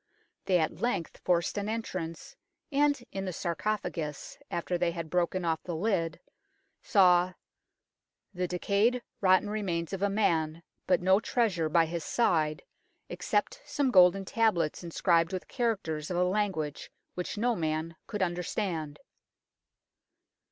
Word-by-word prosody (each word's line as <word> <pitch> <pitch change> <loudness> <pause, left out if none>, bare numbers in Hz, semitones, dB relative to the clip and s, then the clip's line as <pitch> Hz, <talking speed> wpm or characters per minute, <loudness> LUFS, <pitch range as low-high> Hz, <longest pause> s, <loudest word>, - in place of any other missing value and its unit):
They 185 - +3
at 160 -2 -1
length 240 -9 -1
forced 175 +3 +1
an 205 +1 -3
entrance, 185 -7 -5 0.4
and 285 -2 +2
in 195 0 -4
the 185 - -2
sarcophagus, 170 -3 -3
alter 175 +1 -2
they 175 0 +1
had 165 -2 -6
broken 180 0 0
off 160 -1 0
the 175 - -5
lid, 170 -3 0 0.6
saw 185 -3 +4 0.5
" - - -57
the 180 -1 -1
decayed, 205 +7 +1 0.2
rotten 185 +1 +4
remains 190 -5 -2
of 195 - -3
a 200 - +2
man, 165 -5 +1 0.2
but 180 -1 +3
no 190 +2 +5
treasure 205 -9 0
by 165 +1 +4
his 165 0 -4
side, 155 -9 +1 0.5
except - - -1
some 280 - 0
golden 185 -1 +6
tablets 185 -8 +1
inscribed 170 0 +2
with 185 -1 -4
characters 195 - -2
of 180 - -2
a 180 - +3
language 180 -6 -1 0.2
which 180 +3 -4
no 240 +2 +1
man 160 -1 -2
could 210 -3 -1
understand." 175 -3 -2
180 Hz, 135 wpm, -29 LUFS, 165-205 Hz, 0.6 s, golden